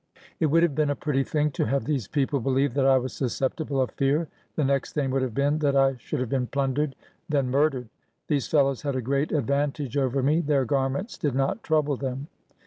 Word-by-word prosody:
It 160 - +3
would 165 +3 +4
have 170 -4 +2
been 150 +1 +1
a 145 - 0
pretty 135 -1 0
thing 150 +1 0
to - - -1
have 135 -3 0
these 135 -9 -1
people 140 -1 0
beheve 135 +1 +1
that 135 0 +2
I 135 -1 +6
was 130 0 -3
susceptible 135 +2 -2
of 130 - +1
fear. 145 +4 0 0.3
The 155 - +1
next 135 0 0
thing 140 -3 0
would 135 0 +1
have 125 -4 -2
been 145 +2 +1
that 145 -2 +1
I 135 -1 +4
should - - -4
have 125 - -1
been 125 -1 0
plundered, 140 +1 -1 0.3
then 140 -4 +1
murdered. 135 -3 +1 0.4
These 145 -4 0
fellows 140 -4 +2
had 140 -3 -2
a 130 - -1
great 140 +4 0
advantage 140 -1 -1
over 135 -1 +1
me. 150 +4 +3
Their 145 -4 +1
garments 135 - -1
did 145 -4 -1
not 135 +11 0
trouble 150 -3 +1
them. 135 +2 -4
140 Hz, 220 wpm, -26 LUFS, 135-150 Hz, 0.4 s, I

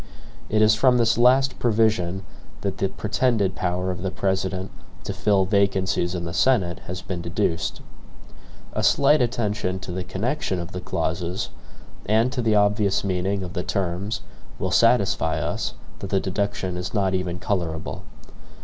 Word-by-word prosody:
It 110 0 +3
is 110 0 +6
from 125 +3 +4
this 115 -1 +3
last 130 +3 +4
provision 105 -5 +1 0.4
that 100 -2 -3
the 95 - +1
pretended 110 -2 0
power 90 +1 -1
of 90 -1 -5
the 95 - -1
President 95 0 -1 0.3
to - - -4
fill 100 -2 +2
vacancies 95 -2 +1
in 85 - -3
the 85 - -4
Senate 100 -9 +2
has 90 0 -5
been 90 -2 -4
deduced. 85 0 -1 0.9
A - - -1
slight 150 -1 +4
attention 105 -6 -1
to 90 - -6
the 90 +1 -3
connection 100 +2 -2
of 85 +1 -5
the 90 - -5
clauses, 85 +3 -2 0.6
and 110 +4 +3
to 125 - -2
the 110 -2 +2
obvious 105 -1 +2
meaning 95 +1 -1
of 90 -1 -6
the 90 - -2
terms, 95 +2 -2 0.4
will - - -2
satisfy - - +3
us - - -2 0.2
that 100 - -6
the 95 - +2
deduction 95 -1 -2
is 90 +5 -4
not 95 -2 +1
even 90 -1 -1
colorable. 85 -5 -3
95 Hz, 160 wpm, -24 LUFS, 90-110 Hz, 0.9 s, is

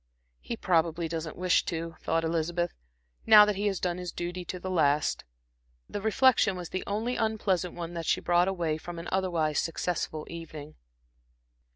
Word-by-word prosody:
"He 235 - -5
probably 165 -3 +1
doesn't 160 -1 -4
wish 180 0 +3
to," 165 -1 -4
thought 165 0 0
Elizabeth, 170 +1 -1 0.5
"now 210 -1 +10
that 210 -1 0
he 205 +2 0
has 195 -2 -1
done 180 -1 -1
his 180 -1 -5
duty 175 +1 -4
to 180 - -5
the 185 +1 -4
last." 150 -4 +2 0.6
The 205 - -5
reflection 220 -2 +4
was 180 -2 -6
the 185 - -3
only 220 +5 -1
unpleasant 200 -5 0
one 170 0 -5
that 165 -2 -5
she - - +2
brought 175 +1 +3
away 170 -5 -1
from 175 +1 -8
an 170 - -6
otherwise 170 -5 +1
successful 165 -2 -2
evening. 155 -3 -8
175 Hz, 170 wpm, -29 LUFS, 165-190 Hz, 0.6 s, now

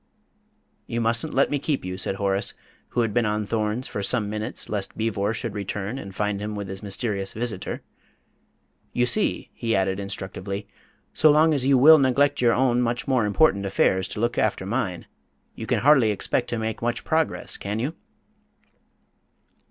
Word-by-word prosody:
"You 115 - -2
mustn't 115 +6 0
let 140 - +3
me 145 - 0
keep 145 - -2
you," 90 0 -4
said 95 +1 -2
Horace, 100 0 0 0.3
who 120 - 0
had 115 -3 -1
been 120 -1 +2
on 105 0 -1
thorns 110 +3 -1
for 100 - -4
some 105 0 0
minutes 110 +2 -4
lest 100 -2 -3
Beevor 110 -2 0
should 115 -1 -4
return 105 +4 -4
and 95 -5 -9
find 105 -1 -1
him 105 0 -4
with 100 -2 -5
his 95 0 -6
mysterious 100 -1 -3
visitor. 110 -4 -3 1.1
"You 125 - +2
see," 210 +12 0
he 115 -2 -1
added 95 0 0
instructively, 100 0 -5 0.5
"so 155 - +5
long 155 +2 +5
as 135 -3 0
you 135 -1 +5
will 155 +5 +8
neglect 140 +1 +2
your 120 -2 +4
own 125 -1 +2
much 120 0 -1
more 130 -5 +2
important 105 -2 +3
affairs 95 -1 +1
to 105 - -5
look 120 +2 0
after 105 -3 0
mine, 95 -5 -2 0.5
you - - -7
can - - +1
hardly 135 -5 +5
expect 105 +4 -1
to 120 - -2
make 110 0 -3
much 120 0 -1
progress, 160 0 -1
can 100 +2 -4
you?" 130 +8 -2
110 Hz, 175 wpm, -24 LUFS, 100-125 Hz, 1.1 s, will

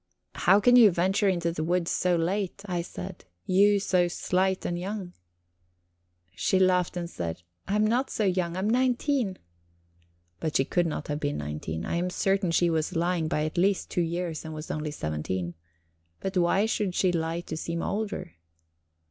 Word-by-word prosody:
"How 195 - +4
can 245 +4 +5
you 230 -4 +9
venture 190 +3 +2
into 170 -2 0
the 155 -2 -3
woods 175 +1 0
so 180 -1 +2
late?" 190 +3 -1
I 180 -3 -1
said 90 - -8 0.2
"you 200 +2 +4
so 180 -2 +2
slight 185 +2 0
and 175 0 -2
young?" 190 -1 -5 1.2
She 190 - +1
laughed, 180 -1 +2
and 170 -1 -3
said: 85 - -5 0.2
"I 200 - 0
am 210 0 +3
not 245 +5 +1
so 215 - -1
young 180 -3 0
I - - -2
am 200 - 0
nineteen." 250 -2 +1 1.0
But 155 - 0
she 135 - +2
could 175 +3 +1
not 150 -1 -3
be 145 -1 -1
nineteen; 75 - -4
I - - -1
am 180 +1 0
certain 195 0 +1
she 170 +1 +3
was 160 0 -1
lying 170 -1 +1
by 150 -1 0
at 155 +3 -2
least 195 +1 +1
two 175 - +1
years, 170 -1 -2
and 160 -1 -7
was 155 +1 -6
only 155 0 -3
seventeen. 85 - -3 0.7
But 195 0 -4
why 180 +3 +3
should 210 -4 -1
she 185 - +3
lie 165 0 -1
to 160 - -6
seem 170 +1 -3
older? 200 - -3
175 Hz, 180 wpm, -27 LUFS, 160-195 Hz, 1.2 s, you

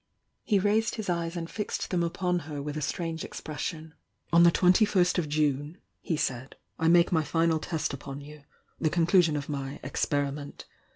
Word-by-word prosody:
He 210 - +2
raised 210 +3 +2
his 215 -5 -2
eyes 170 0 -2
and 165 -1 -4
fixed 210 +4 -4
them 180 -2 +1
upon 180 +1 0
her 145 -2 -4
with 145 +1 -4
a 155 - -3
strange 165 +1 -3
expression. 155 +1 -6 0.4
"On 170 - +7
the 170 - +8
twenty 180 +4 +4
first 180 -4 +2
of 155 -4 -2
June," 150 +1 0 0.2
he 165 - -1
said, 130 -1 -3 0.2
"I 160 - +2
make 170 +1 +5
my 160 -3 +2
final 165 0 +1
test 160 -2 -2
upon 140 0 -7
you 150 +1 -12 0.2
— - - -41
the 155 - +3
conclusion 170 -1 +3
of 145 - -5
my 140 -1 -4
'ex - - -2
periment.' 145 0 -3
165 Hz, 190 wpm, -28 LUFS, 145-175 Hz, 0.4 s, the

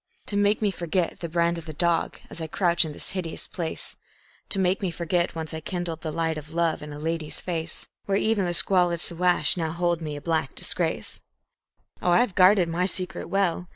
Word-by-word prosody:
To 205 - -2
make 205 +2 +2
me 205 - +3
forget 175 -1 -1
the 170 - -4
brand 170 0 +1
of 165 - -12
the 155 - -5
dog, 170 +2 +1
as 170 - -6
I 160 - -3
crouch 175 +1 +3
in 155 - -5
this - - -3
hideous 180 -4 -3
place; 165 -3 -4 0.5
To - - +4
make 190 +1 +2
me 190 - 0
forget 170 +1 -1
once 160 -1 -5
I 160 - -3
kindled 170 -1 -3
the 155 - -3
light 160 0 -1
of 150 +2 -11
love 170 -2 +1
in 150 0 -7
a 145 - -7
lady's 160 0 -2
face, 165 -2 -3 0.2
Where 195 0 +1
even 215 -2 +2
the 175 0 0
squalid 175 -3 +4
Siwash 175 -2 +3
now 165 -2 -1
holds 170 0 0
me 150 -2 -4
a - - -5
black 160 -3 -1
disgrace. - - -1 0.8
Oh, - - +1
I 175 +7 +6
have 245 -6 0
guarded 185 0 +6
my 175 +2 0
secret 185 -1 -2
well! 185 -2 0
170 Hz, 215 wpm, -26 LUFS, 160-185 Hz, 0.8 s, I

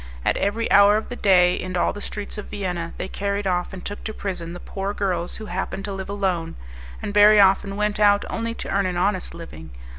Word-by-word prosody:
At - - +2
every 220 +3 0
hour 200 +1 +7
of 220 - -5
the 245 - -5
day, 180 -5 +4
in 185 0 -3
all - - +1
the 205 - -8
streets 210 0 -6
of 210 - -7
Vienna, 180 -4 -4
they - - -4
carried 200 +1 -2
off 180 -2 0
and 185 -1 -9
took 205 - -5
to 220 - -4
prison 175 -4 -5
the 175 - -8
poor 195 +2 -4
girls 180 -3 -1
who 220 - -7
happened 190 +1 -4
to 200 - -4
live 190 0 -6
alone, 190 -5 -2 0.5
and 205 - -3
very 210 +1 +7
often 195 0 +4
went 210 0 -1
out 205 -1 +4
only 230 0 -3
to - - -6
earn 195 -1 +1
an 180 -1 -3
honest 185 -1 -1
living. 80 - -10
195 Hz, 230 wpm, -23 LUFS, 180-205 Hz, 0.5 s, hour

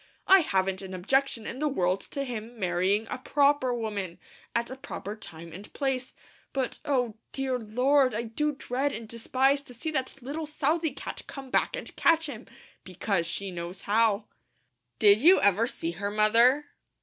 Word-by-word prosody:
I 385 0 +8
haven't 190 - 0
an 190 -1 -7
objection 235 +4 0
in 255 - -5
the 305 - +1
world 185 -9 0
to 280 - -3
him 240 -2 -6
marrying 185 +3 +1
a - - -3
PROPER 280 -1 +2
woman, 210 -7 -3 0.4
at 235 +1 0
a - - -5
proper 215 -5 -7
time 165 -6 -10
and 195 +4 -10
place; 260 -2 -2 0.4
but 265 -2 -2
Oh, 245 -6 0
dear 265 -2 -1
Lord, 255 +3 +2
I 230 - -1
do 295 +7 -1
dread 275 0 -2
and 225 +1 -6
despise 260 +5 +1
to 250 -3 -14
see 310 +7 -3
that 265 -4 -2
little 295 +5 -5
Southey 310 +2 0
cat - - -6
come 270 -2 -8
back - - +1
and - - -6
catch 330 -1 +3
him, 290 - -7 0.4
because 185 -1 -1
she 195 +3 -3
knows 175 +2 -6
how." 215 0 +2 0.7
"Did 205 0 +6
you 345 +9 +7
ever 205 +4 +3
see 165 -8 -2
her, 200 +4 -3
Mother?" 235 +7 +4
235 Hz, 175 wpm, -28 LUFS, 200-275 Hz, 0.7 s, I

